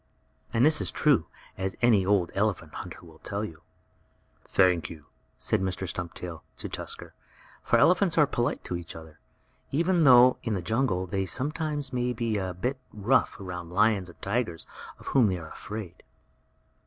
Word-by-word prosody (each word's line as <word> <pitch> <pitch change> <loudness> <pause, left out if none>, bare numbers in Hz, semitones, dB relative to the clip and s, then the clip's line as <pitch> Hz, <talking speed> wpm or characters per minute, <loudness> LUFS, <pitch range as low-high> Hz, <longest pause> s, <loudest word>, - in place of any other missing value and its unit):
And 115 +3 +3
this 155 0 +4
is - - 0
true, 140 - +3 0.3
as 95 -1 -2
any 115 -5 +4
old 95 -4 +2
elephant 95 -6 -1
hunter - - -7
will 80 -1 -16
tell 100 +1 -3
you. 80 -6 -10 0.8
"Thank 90 -3 +3
you," 75 -3 -11 0.3
said - - 0
Mr. 95 0 -2
Stumptail, 85 -1 -5 0.2
to - - -5
Tusker; - - -5 0.5
for - - +3
elephants 180 -1 +4
are 150 - +7
polite 120 -3 -1
to 90 - -3
each 85 -1 -6
other, 80 -1 -12 0.5
even 170 +3 +2
though, 125 -2 +7
in 115 -3 -1
the 95 - -2
jungle, 110 -3 0
they 95 +1 -2
sometimes 145 - -2
may 125 0 0
be 115 -2 -1
a 95 -2 -3
bit 125 +9 -2
rough 105 +4 +2
toward 90 -4 -6
lions 100 +1 +2
and 85 - -15
tigers, 100 -5 -1 0.3
of - - -16
whom 130 -5 +5
they 95 -2 0
are 80 -2 -9
afraid. 105 -5 -7
100 Hz, 165 wpm, -28 LUFS, 90-125 Hz, 0.8 s, are